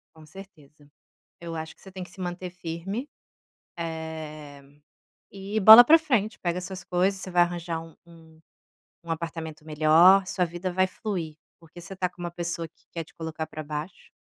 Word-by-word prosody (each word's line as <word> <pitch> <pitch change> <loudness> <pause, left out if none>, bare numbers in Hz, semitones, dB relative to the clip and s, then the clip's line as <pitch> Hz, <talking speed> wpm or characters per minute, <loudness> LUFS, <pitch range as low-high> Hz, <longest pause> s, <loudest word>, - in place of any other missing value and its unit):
Com 160 -1 -15
certeza, 150 -4 -15 0.5
eu 170 -1 -6
acho 160 0 -6
que - - -24
você 190 - -12
tem 185 -1 -7
que 180 - -16
se 190 - -13
manter 180 0 -5
firme, 180 - -5 0.7
eh, 160 -3 -7 0.7
e 200 +2 -4
bola 220 +4 +11
para 325 +5 +7
frente. 240 -9 0
Pega 175 0 -1
suas 185 0 -7
coisas, 185 +2 0
você 185 - -6
vai 175 -1 +4
arranjar 170 -1 -2
um 165 -1 -15
um 160 -1 -18 0.6
um 170 - -5
apartamento 160 -1 -5
melhor, 160 +5 +5
sua 185 - 0
vida 175 +2 -3
vai 185 +1 +3
fluir, 180 -6 -5 0.2
porque 165 +1 -14
você 180 +3 -9
tá 180 -1 -1
com 180 - -15
uma 175 - -4
pessoa 170 -1 -4
que 160 - -34
quer 165 -1 -5
te - - -21
colocar 160 -1 -5
pra 155 - -7
baixo. 150 +4 -7
170 Hz, 180 wpm, -26 LUFS, 160-185 Hz, 0.7 s, bola